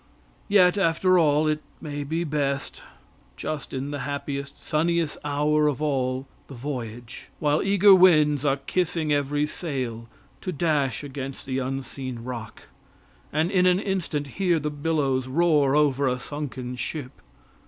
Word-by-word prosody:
Yet, 200 -1 +5
after 185 +1 +3
all, 155 -1 +3
it 155 0 0 0.2
may 145 -2 -5
be 160 +4 -2
best, 140 -3 -2 0.6
just 155 -2 -4
in 135 +2 -4
the 145 - -4
happiest, 140 -1 -4
sunniest 165 0 0
hour 150 +1 +2
of 145 -4 0
all 130 -3 -1 0.2
the 135 - -10
voyage, 120 -3 -6
while 150 0 +1
eager 195 0 +6
winds 155 -6 +5
are 140 -1 +2
kissing 160 +1 -1
every 145 +1 +1
sail, 130 -8 -4 0.3
to 185 - -3
dash 145 -6 0
against 135 -1 -6
the 130 0 -2
unseen 130 -2 -5
rock, 115 -3 -7 0.7
and 160 +4 +1
in 185 -1 +4
an 180 0 +4
instant 185 -7 -2
hear 175 +4 +1
the 150 -1 -2
billows 145 -4 0
roar 145 -1 +3
over 140 -2 +3
a 125 -1 +1
sunken 130 -2 -5
ship. 130 +1 -4
145 Hz, 145 wpm, -25 LUFS, 135-160 Hz, 0.7 s, eager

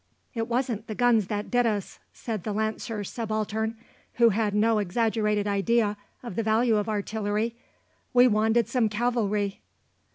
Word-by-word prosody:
"It 225 -2 -2
wasn't 235 -3 -1
the 215 - -5
guns 235 -5 +3
that 205 0 -4
did 245 -1 +3
us," 205 -3 -3
said 220 -4 -5
the 215 - -3
Lancer 220 0 -2
Subaltern, 220 +1 -3 0.4
who 235 -1 +5
had 210 -1 0
no 220 +1 +3
exaggerated 210 +1 0
idea 210 +1 +1 0.3
of 235 -7 -7
the 230 - 0
value 220 +1 +2
of 210 +1 -1
artillery; 215 +2 -2 0.6
"we 250 0 +6
wanted 220 0 +2
some 235 -2 +1
cavalry." 210 -3 -1
220 Hz, 150 wpm, -26 LUFS, 210-235 Hz, 0.6 s, we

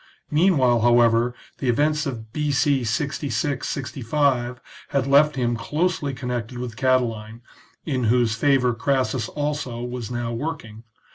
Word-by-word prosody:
Meanwhile, 150 -7 +3
however, 120 0 +4 0.2
the 130 - -1
events 150 +4 +1
of 110 -4 -7
B.C. 145 -2 +1
66 140 +3 -2
65 130 -2 -1 0.3
had 140 -2 0
left 145 +2 +4
him 120 -2 0
closely 150 - -1
connected 125 -2 -4
with 120 -2 -5
Catiline, 115 -3 0 0.4
in 130 -6 -1
whose 120 0 +3
favour 125 0 +2
Crassus 130 -1 0
also 145 -5 -3
was 125 -2 -5
now 120 -1 -3
working. 115 -5 -6
125 Hz, 125 wpm, -23 LUFS, 120-145 Hz, 0.4 s, however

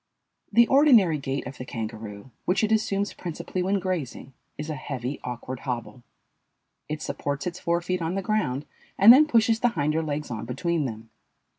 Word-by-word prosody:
The 235 0 +6
ordinary 235 - +5
gait 135 0 -3
of 130 +1 -8
the - - -4
kangaroo, 110 -1 -7
which 185 +4 +1
it 215 - +1
assumes 205 -2 +1
principally 175 +1 -5
when 195 +2 +1
grazing, 175 -8 -4 0.2
is 150 - -5
a 155 - -3
heavy, 135 -1 -5
awkward 125 +1 -5
hobble. 125 0 -5 0.9
It 155 0 -4
supports 140 0 -3
its 180 0 -4
fore 170 0 0
feet 180 +1 -2
on 165 +2 -2
the 195 - -2
ground 150 - -1 0.3
and 210 +5 +10
then 300 +4 +6
pushes 225 -4 +3
the 245 - +3
hinder 155 -5 0
legs 150 -3 -4
on 110 -2 -4
between 165 +5 -1
them. 110 -2 -7
155 Hz, 175 wpm, -26 LUFS, 130-195 Hz, 0.9 s, and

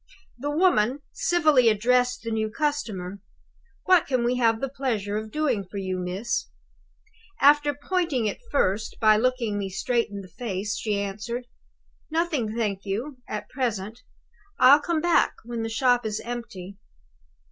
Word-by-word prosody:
The 290 +3 -3
woman 290 - +2
civilly 310 -9 +3
addressed 245 +4 +2
the 230 - -4
new 220 -1 -1
customer. 215 -8 -3 0.6
'What 365 -3 +4
can 255 -3 +1
we 245 +1 +1
have 230 -2 +3
the 270 - -1
pleasure 230 -7 -2
of 215 +1 -3
doing 260 -6 0
for 190 +2 -9
you, 185 -1 -2
miss?' 195 +7 -2 0.9
After 290 0 +5
pointing 300 -5 -1
it 210 - -2
first 210 -5 0
by 215 -2 +5
looking 235 -3 0
me 195 -1 -3
straight 230 +5 0
in 200 -1 -6
the 190 - -11
face, 205 -1 -4
she 210 -2 -1
answered, 210 +5 -4 0.6
'Nothing, 310 -9 -1
thank 205 -4 -1
you, 240 +8 -4
at 210 -1 -4
present. 230 -3 -3 0.6
I'll 280 +3 +7
come 325 +1 -1
back 345 0 +3
when 235 0 -5
the 225 - -2
shop 245 +1 +2
is 215 -1 -2
empty. 200 -6 -7
235 Hz, 150 wpm, -25 LUFS, 210-275 Hz, 0.9 s, I'll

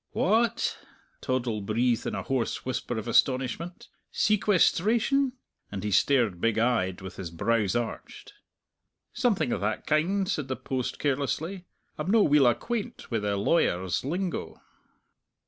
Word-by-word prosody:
"Wha 225 +5 +3
at!" 235 +1 -3 0.4
Toddle 120 -5 -1
breathed 115 +3 0
in - - -2
a - - -3
hoarse 130 -5 -2
whisper 125 -2 -3
of 110 +1 -5
astonishment, 135 - 0 0.2
"sequesteration?" 215 +6 +2 0.4
and 100 -1 -5
he 105 - -2
stared, 115 -6 +2
big 115 -1 +1
eyed, 110 -6 +1
with 95 0 -9
his 95 -3 -5
brows 105 +5 0
arched. 120 - -5 0.8
"Something 210 - +1
o' - - -1
that 105 +1 -2
kind," 185 +6 +1
said 150 -6 -2
the 130 - -2
post 130 -2 -3
carelessly. 150 +6 -2 0.3
"I'm - - -2
no' 220 0 +5
weel 145 -5 +5
acquaint 230 - -2
wi' 115 - +1
the 105 -1 -1
law 105 +12 +2
wers' 90 - 0
lingo." 175 +6 -3
130 Hz, 145 wpm, -27 LUFS, 110-190 Hz, 0.8 s, no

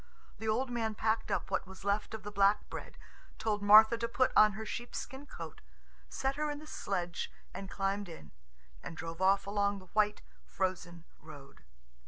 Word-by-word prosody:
The 220 - -4
old 245 +4 +1
man 225 -2 -1
packed 220 +2 0
up - - -1
what - - 0
was 190 0 -12
left 205 +2 0
of 215 - -8
the 210 - -6
black 200 +1 +3
bread, - - -7 0.4
told 215 -2 -1
Martha 220 +3 +8
to 230 - 0
put 255 +2 +2
on 215 -1 +7
her 220 +2 -6
sheepskin 265 +5 -6
coat, 165 - -9 0.5
set 270 +1 -1
her 300 0 0
in 295 - -3
the 305 - -10
sledge 180 - -3 0.2
and 195 -1 -6
climbed 195 0 -1
in, 75 - -11 0.5
and 165 - -8
drove 165 +2 -6
off 195 +1 +4
along 200 0 +1
the 185 -2 -15
white, 210 -1 +2 0.2
frozen 180 -3 -3 0.2
road. 145 -3 -13
205 Hz, 180 wpm, -33 LUFS, 190-220 Hz, 0.5 s, Martha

